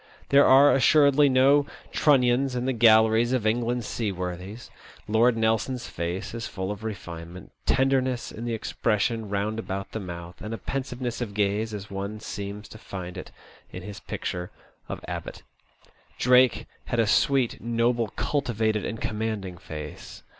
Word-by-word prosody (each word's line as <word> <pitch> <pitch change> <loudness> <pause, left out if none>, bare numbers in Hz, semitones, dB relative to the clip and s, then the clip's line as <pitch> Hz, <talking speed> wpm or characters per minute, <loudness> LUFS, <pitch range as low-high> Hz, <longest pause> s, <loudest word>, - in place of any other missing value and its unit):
There 140 +1 +6
are 140 +2 +7
assuredly 140 +1 +5
no 135 +2 +4 0.2
Trunnions 130 -2 +3
in 125 0 -2
the 130 - +1
galleries 110 +1 +5
of 125 -4 0
England's 120 +1 0
sea 110 -2 -2
worthies. 90 +4 -6 0.4
Lord 115 +2 +3
Nelson's 115 +3 0
face 85 +5 -4
is 115 0 -4
full 95 -2 -4
of 105 +1 -7
refinement, 85 -4 -7 0.2
tenderness 130 -2 +1
in 115 - -8
the 115 -1 -1
expression 110 0 -1
round 105 +2 -1
about 100 -3 -5
the 110 - -4
mouth, 85 -2 -8
and 110 +2 -4
a - - -7
pensiveness 125 -2 -4
of 105 -4 -4
gaze 105 +2 0
as 105 -1 -7
one 100 +2 -4
seems 105 0 -6
to 110 - -11
find 90 -3 -7
it - - -7 0.4
in 90 - -8
his 105 0 -8
picture 90 0 -5 0.4
by - - -4
Abbot. - - -6 0.7
Drake 125 0 +4 0.2
had 120 - -2
a 115 - +4
sweet, 130 +3 +2
noble, 115 0 +1
cultivated, 110 -7 0
and 110 - -4
commanding 105 -5 -3
face. 75 -2 -9
110 Hz, 155 wpm, -26 LUFS, 100-125 Hz, 0.7 s, are